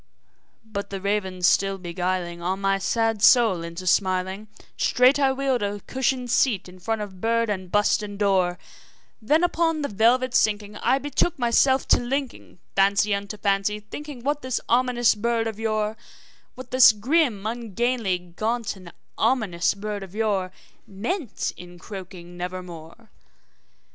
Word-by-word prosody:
"' -, -, -44 dB, 0.2 s
But 200 Hz, -2 st, -5 dB
the 195 Hz, -, -5 dB
raven 190 Hz, -2 st, -2 dB
still 195 Hz, +2 st, +3 dB
beguiling 175 Hz, -1 st, -3 dB
all 185 Hz, +2 st, -1 dB
my 195 Hz, 0 st, 0 dB
sad 225 Hz, +2 st, 0 dB
soul 220 Hz, -7 st, +5 dB
into 170 Hz, +2 st, -7 dB
smiling, 190 Hz, +2 st, 0 dB, 0.3 s
Straight 255 Hz, +3 st, +3 dB
I 270 Hz, -1 st, +3 dB
wheeled 265 Hz, -2 st, 0 dB
a 205 Hz, 0 st, -2 dB
cushioned 260 Hz, 0 st, -1 dB
seat 240 Hz, -7 st, +2 dB
in 180 Hz, 0 st, -14 dB
front 220 Hz, +3 st, -2 dB
of 190 Hz, -3 st, -10 dB
bird 230 Hz, -1 st, +1 dB
and 185 Hz, -3 st, -5 dB
bust 205 Hz, +1 st, +2 dB
and 205 Hz, -1 st, -7 dB
door; 190 Hz, -3 st, +1 dB, 0.6 s
Then, 300 Hz, +10 st, +2 dB
upon 325 Hz, -3 st, +1 dB
the -, -, 0 dB
velvet 240 Hz, +4 st, +2 dB
sinking, 210 Hz, -1 st, +1 dB
I 265 Hz, -, +2 dB
betook 290 Hz, +4 st, -1 dB
myself 260 Hz, +2 st, +2 dB
to -, -, +5 dB
linking 265 Hz, -2 st, -4 dB, 0.2 s
Fancy 200 Hz, +1 st, +3 dB
unto 200 Hz, +1 st, -4 dB
fancy, 200 Hz, +1 st, 0 dB
thinking 265 Hz, +4 st, -9 dB
what 290 Hz, +2 st, -1 dB
this 255 Hz, -1 st, -2 dB
ominous 240 Hz, -1 st, +3 dB
bird 230 Hz, +1 st, -1 dB
of 220 Hz, -1 st, -5 dB
yore 215 Hz, -1 st, -1 dB, 0.6 s
What 255 Hz, -1 st, -10 dB
this 255 Hz, -3 st, +7 dB
grim, 235 Hz, -2 st, +1 dB
ungainly, 230 Hz, -2 st, -1 dB
ghastly, 180 Hz, -1 st, -18 dB
gaunt, 230 Hz, 0 st, -1 dB
and 180 Hz, -3 st, -12 dB, 0.3 s
ominous 195 Hz, -9 st, +1 dB
bird 205 Hz, 0 st, -5 dB
of 195 Hz, 0 st, -10 dB
yore 200 Hz, -4 st, 0 dB, 0.4 s
Meant 235 Hz, -, -3 dB
in 175 Hz, 0 st, -12 dB
croaking 180 Hz, -2 st, -10 dB
`Nevermore.' 180 Hz, +3 st, -8 dB
210 Hz, 155 wpm, -24 LUFS, 190-245 Hz, 0.6 s, this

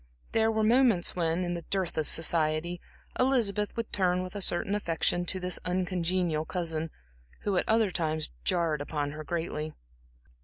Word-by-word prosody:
There 225 Hz, 0 st, +3 dB
were 220 Hz, 0 st, +1 dB
moments 230 Hz, -5 st, +4 dB
when, 170 Hz, 0 st, +1 dB
in 175 Hz, 0 st, -1 dB
the 170 Hz, -, -3 dB
dearth 190 Hz, 0 st, -2 dB
of 155 Hz, -2 st, 0 dB
society, 165 Hz, +1 st, +1 dB, 0.4 s
Elizabeth 225 Hz, -6 st, +2 dB
would 230 Hz, -1 st, -3 dB
turn 180 Hz, -2 st, +2 dB
with 185 Hz, -, -7 dB
a 205 Hz, -, -3 dB
certain 185 Hz, +2 st, +1 dB
affection 175 Hz, -2 st, 0 dB
to 185 Hz, -, 0 dB
this 180 Hz, 0 st, 0 dB
uncongenial 180 Hz, -3 st, 0 dB
cousin, 165 Hz, -2 st, -2 dB, 0.5 s
who 200 Hz, -2 st, 0 dB
at -, -, 0 dB
other 220 Hz, -3 st, +4 dB
times 155 Hz, -3 st, -1 dB
jarred 165 Hz, -4 st, +1 dB
upon 145 Hz, -1 st, -2 dB
her 155 Hz, +1 st, -7 dB
greatly. 155 Hz, -1 st, -3 dB
175 Hz, 160 wpm, -29 LUFS, 160-195 Hz, 0.5 s, moments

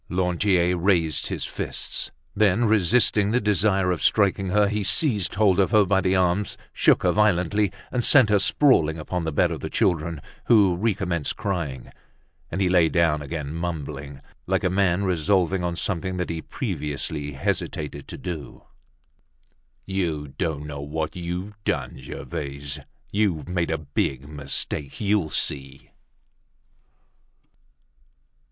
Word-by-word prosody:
Lantier 90 Hz, 0 st, +1 dB
raised 85 Hz, -5 st, +1 dB
his -, -, -3 dB
fists; -, -, -3 dB, 0.3 s
then, 105 Hz, +2 st, +3 dB
resisting 105 Hz, 0 st, +3 dB
the 120 Hz, +3 st, +2 dB
desire 95 Hz, -3 st, +2 dB
of 90 Hz, -, -2 dB
striking 100 Hz, -2 st, +2 dB
her, 105 Hz, +2 st, +3 dB
he 105 Hz, 0 st, -1 dB
seized 105 Hz, -, +1 dB
hold 100 Hz, -2 st, +3 dB
of 95 Hz, -, +3 dB
her 105 Hz, -2 st, +4 dB
by 95 Hz, 0 st, +2 dB
the 95 Hz, 0 st, +1 dB
arms, 90 Hz, +2 st, +1 dB, 0.2 s
shook -, -, +3 dB
her -, -, +3 dB
violently 105 Hz, -1 st, +2 dB, 0.2 s
and 125 Hz, -1 st, 0 dB
sent 125 Hz, -6 st, +6 dB
her 105 Hz, -, +5 dB
sprawling 95 Hz, -, +3 dB
upon 85 Hz, +2 st, -3 dB
the 80 Hz, -, -1 dB
bed 70 Hz, -, +2 dB
of -, -, -4 dB
the -, -, -5 dB
children, 85 Hz, -3 st, 0 dB, 0.3 s
who 100 Hz, -6 st, +5 dB
recommenced 90 Hz, -6 st, -1 dB
crying. 85 Hz, -, -4 dB, 0.6 s
And 95 Hz, -, -3 dB
he 95 Hz, -, +3 dB
lay 90 Hz, -3 st, +4 dB
down 80 Hz, -3 st, +2 dB
again, 75 Hz, 0 st, -5 dB
mumbling, 75 Hz, -5 st, -5 dB, 0.3 s
like -, -, 0 dB
a 90 Hz, -, +1 dB
man 95 Hz, 0 st, +2 dB
resolving 90 Hz, 0 st, +1 dB
on 85 Hz, -1 st, -1 dB
something 95 Hz, +1 st, -2 dB
that 90 Hz, -2 st, -2 dB
he 80 Hz, -1 st, -4 dB
previously 75 Hz, -1 st, -3 dB
hesitated 70 Hz, +1 st, -3 dB
to -, -, -7 dB
do: 85 Hz, -5 st, -7 dB, 1.2 s
"You 85 Hz, -7 st, -2 dB
don't 75 Hz, +1 st, -3 dB
know 70 Hz, -1 st, -6 dB
what 80 Hz, +2 st, -4 dB
you've 90 Hz, +4 st, -6 dB
done, 65 Hz, -6 st, -2 dB
Gervaise. 70 Hz, 0 st, -6 dB, 0.3 s
You've 100 Hz, -7 st, 0 dB
made 90 Hz, -2 st, -1 dB
a 80 Hz, -, 0 dB
big 70 Hz, -2 st, -2 dB
mistake; 75 Hz, -1 st, -3 dB
you'll 100 Hz, -6 st, +1 dB
see." 70 Hz, -2 st, -3 dB
90 Hz, 140 wpm, -24 LUFS, 75-100 Hz, 1.2 s, sent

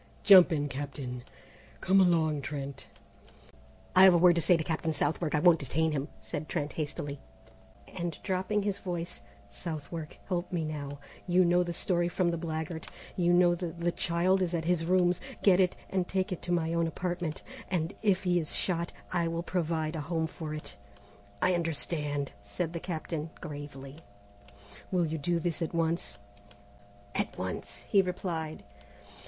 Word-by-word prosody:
Jump 190 Hz, -3 st, +9 dB
in, 145 Hz, -2 st, 0 dB
Captain! 135 Hz, -3 st, -5 dB, 0.6 s
Come 195 Hz, +1 st, +4 dB
along, 160 Hz, -5 st, +3 dB
Trent!" 140 Hz, 0 st, -5 dB, 1.1 s
"I 185 Hz, -, +9 dB
have 185 Hz, -2 st, +8 dB
a -, -, +6 dB
word 175 Hz, +1 st, +7 dB
to 170 Hz, -, +1 dB
say 175 Hz, +1 st, +5 dB
to 160 Hz, -, -2 dB
Captain 160 Hz, 0 st, -1 dB
Southwark, 155 Hz, +1 st, 0 dB
I -, -, +3 dB
won't 175 Hz, -1 st, +6 dB
detain 160 Hz, +4 st, 0 dB
him," 145 Hz, -1 st, -2 dB
said 155 Hz, -, -5 dB
Trent 145 Hz, 0 st, -2 dB
hastily, 145 Hz, -2 st, -4 dB, 0.7 s
and 170 Hz, -3 st, -4 dB
dropping 190 Hz, +2 st, 0 dB
his 200 Hz, -1 st, -1 dB
voice, 175 Hz, -2 st, -4 dB, 0.3 s
"Southwark, 155 Hz, -, -6 dB
help 175 Hz, -1 st, -2 dB
me 170 Hz, -3 st, -1 dB
now. 145 Hz, -2 st, -5 dB, 0.3 s
You 180 Hz, +1 st, +5 dB
know 175 Hz, +1 st, +4 dB
the 175 Hz, -1 st, -1 dB
story 175 Hz, 0 st, +1 dB
from 175 Hz, -1 st, +1 dB
the 170 Hz, -, -2 dB
blackguard. 160 Hz, 0 st, -4 dB, 0.3 s
You 175 Hz, -1 st, +2 dB
know 175 Hz, 0 st, +5 dB
the 175 Hz, 0 st, -3 dB
the 170 Hz, +1 st, -1 dB
child 175 Hz, +3 st, +2 dB
is 175 Hz, -1 st, 0 dB
at 160 Hz, -1 st, -2 dB
his 170 Hz, -1 st, +1 dB
rooms. 180 Hz, 0 st, +3 dB, 0.2 s
Get 190 Hz, -2 st, +6 dB
it, 185 Hz, -1 st, +3 dB, 0.2 s
and 185 Hz, -2 st, 0 dB
take 190 Hz, +1 st, -1 dB
it 180 Hz, -, -3 dB
to 175 Hz, -, -4 dB
my 165 Hz, -1 st, +1 dB
own 170 Hz, 0 st, +2 dB
apartment, 175 Hz, -2 st, -3 dB, 0.3 s
and 175 Hz, 0 st, -1 dB
if 195 Hz, -3 st, +2 dB
he 175 Hz, -1 st, +3 dB
is 155 Hz, -3 st, -2 dB
shot, 170 Hz, -2 st, 0 dB, 0.2 s
I 170 Hz, -2 st, +2 dB
will 165 Hz, +1 st, -2 dB
provide 165 Hz, -3 st, -1 dB
a 160 Hz, -, -2 dB
home 160 Hz, +2 st, -1 dB
for 160 Hz, -1 st, -5 dB
it." 155 Hz, -, -8 dB, 0.7 s
"I 185 Hz, -, +4 dB
understand," 150 Hz, -4 st, -1 dB
said 155 Hz, -, -3 dB
the 170 Hz, -, -3 dB
Captain 160 Hz, -2 st, -4 dB
gravely. 145 Hz, -1 st, -8 dB, 0.9 s
"Will 180 Hz, -2 st, +2 dB
you 160 Hz, 0 st, -3 dB
do 170 Hz, +4 st, 0 dB
this 170 Hz, 0 st, -2 dB
at 165 Hz, +1 st, -2 dB
once?" 165 Hz, -4 st, 0 dB, 1.0 s
"At -, -, -2 dB
once," 100 Hz, +2 st, -5 dB
he 200 Hz, -, +5 dB
replied. 170 Hz, -, -3 dB
170 Hz, 170 wpm, -30 LUFS, 155-180 Hz, 1.1 s, Jump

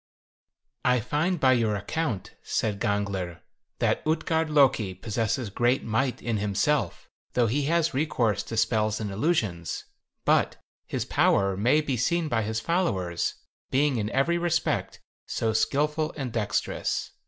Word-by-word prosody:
56. 125 Hz, -3 st, +2 dB
"I -, -, -22 dB
find 170 Hz, +4 st, +1 dB
by 130 Hz, -2 st, +5 dB
your 115 Hz, -4 st, +1 dB
account," 110 Hz, -, -3 dB
said 105 Hz, -2 st, -1 dB
Gangler, 100 Hz, -5 st, -2 dB, 0.4 s
"that -, -, +1 dB
Utgard 160 Hz, 0 st, 0 dB
Loki 130 Hz, -10 st, +3 dB
possesses 110 Hz, +3 st, -2 dB
great 120 Hz, +5 st, +2 dB
might 120 Hz, +4 st, -1 dB
in 115 Hz, -2 st, 0 dB
himself, 105 Hz, +9 st, 0 dB, 0.3 s
though 120 Hz, -, +3 dB
he 135 Hz, +6 st, 0 dB
has 165 Hz, +1 st, +2 dB
recourse 125 Hz, -, +1 dB
to 115 Hz, -, -5 dB
spells 110 Hz, -1 st, +1 dB
and 105 Hz, -2 st, -3 dB
illusions; 105 Hz, -, -1 dB, 0.4 s
but -, -, +3 dB, 0.3 s
his -, -, -2 dB
power 100 Hz, -1 st, +2 dB
may 120 Hz, +10 st, +3 dB
be 140 Hz, -4 st, -2 dB
seen 165 Hz, +6 st, +1 dB
by 115 Hz, -4 st, +1 dB
his 110 Hz, +1 st, -2 dB
followers, 100 Hz, -, 0 dB, 0.3 s
being 140 Hz, -1 st, +2 dB
in 105 Hz, -1 st, -1 dB
every 165 Hz, +8 st, +1 dB
respect 170 Hz, -1 st, 0 dB, 0.3 s
so 110 Hz, -1 st, -1 dB
skillful 150 Hz, +6 st, 0 dB
and 130 Hz, -5 st, -4 dB
dexterous. 110 Hz, -3 st, -1 dB
120 Hz, 140 wpm, -27 LUFS, 105-150 Hz, 0.4 s, by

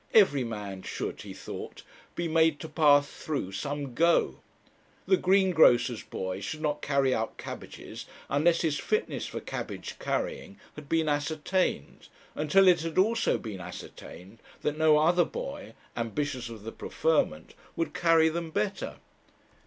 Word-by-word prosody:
Every 145 Hz, -, +6 dB
man 105 Hz, -5 st, -5 dB
should, -, -, -5 dB
he -, -, -9 dB
thought, -, -, -8 dB, 0.3 s
be 170 Hz, -, -1 dB
made 160 Hz, -1 st, +3 dB
to 160 Hz, -, -5 dB
pass 145 Hz, -2 st, +4 dB
through 140 Hz, -13 st, -4 dB
some 140 Hz, +5 st, -4 dB
'go.' 170 Hz, +6 st, +2 dB, 0.7 s
The 380 Hz, -, +5 dB
greengrocer's 180 Hz, -, +4 dB
boy 95 Hz, 0 st, -5 dB
should 110 Hz, +11 st, -5 dB
not 150 Hz, -1 st, -1 dB
carry 140 Hz, -2 st, +2 dB
out 110 Hz, -1 st, -2 dB
cabbages -, -, -8 dB, 0.2 s
unless 165 Hz, +4 st, +2 dB
his 155 Hz, -3 st, 0 dB
fitness 435 Hz, +2 st, -1 dB
for -, -, -5 dB
cabbage -, -, -6 dB
carrying 475 Hz, -, -3 dB, 0.2 s
had 150 Hz, -2 st, -11 dB
been 165 Hz, -1 st, +2 dB
ascertained, 150 Hz, -, -1 dB, 0.3 s
and 150 Hz, 0 st, -3 dB
till 195 Hz, +3 st, +6 dB
it 180 Hz, -3 st, +6 dB
had 165 Hz, -1 st, -4 dB
also 225 Hz, +5 st, +3 dB
been 105 Hz, -5 st, -7 dB
ascertained 95 Hz, +5 st, -10 dB, 0.2 s
that 150 Hz, -, 0 dB
no 155 Hz, -1 st, +5 dB
other 175 Hz, +3 st, +4 dB
boy, -, -, -6 dB, 0.2 s
ambitious 125 Hz, +1 st, -3 dB
of 110 Hz, -3 st, -10 dB
the 115 Hz, -, -6 dB
preferment, 150 Hz, -, 0 dB, 0.2 s
would 165 Hz, -, -2 dB
carry 165 Hz, -2 st, +4 dB
them 165 Hz, +1 st, -2 dB
better. 200 Hz, +3 st, -2 dB
155 Hz, 145 wpm, -28 LUFS, 130-170 Hz, 0.7 s, Every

